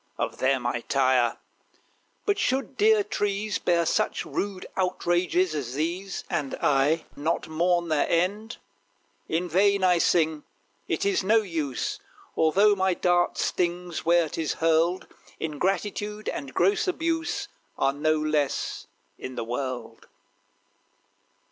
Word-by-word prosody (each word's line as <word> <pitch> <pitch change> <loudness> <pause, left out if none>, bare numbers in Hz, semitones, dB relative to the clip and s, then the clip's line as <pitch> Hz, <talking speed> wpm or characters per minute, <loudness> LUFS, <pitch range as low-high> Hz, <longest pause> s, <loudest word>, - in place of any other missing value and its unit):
Of - - -3
them 130 -1 +1
I 120 0 0
tire. 130 -3 +2 0.9
But 410 -1 +1
should 265 -5 0
dear 430 0 +4
trees 205 - -2
Bear 170 -1 +2
such - - 0
rude 195 -2 -3
outrages 180 -1 +1
as 130 -4 -4
these, 175 +6 -3
And 140 -3 -2
I 145 +4 +2
not 160 +4 -1
mourn 170 +2 +1
their 155 -2 +1
end? 200 +7 0 0.7
In 170 +3 -1
vain 195 +3 +3
I 180 -2 +4
sing: 160 -3 +2 0.4
it - - -1
is 400 -1 +1
no 220 +3 +4
use; 155 - -3 0.4
Although 195 +7 +4
my 190 -1 +1
dart 175 0 +2
stings 175 -1 -1
where 170 0 +3
'tis 155 +1 -2
hurled. 165 +3 +2 0.3
Ingratitude 195 +6 -2
and 140 -2 -5
gross 190 - +2
abuse 330 -1 -1 0.3
Are 135 0 +2
no 155 +2 +1
less 155 -2 -1 0.3
in 130 - -7
the 120 - -3
world. 125 +1 -5
175 Hz, 125 wpm, -26 LUFS, 150-195 Hz, 0.9 s, dear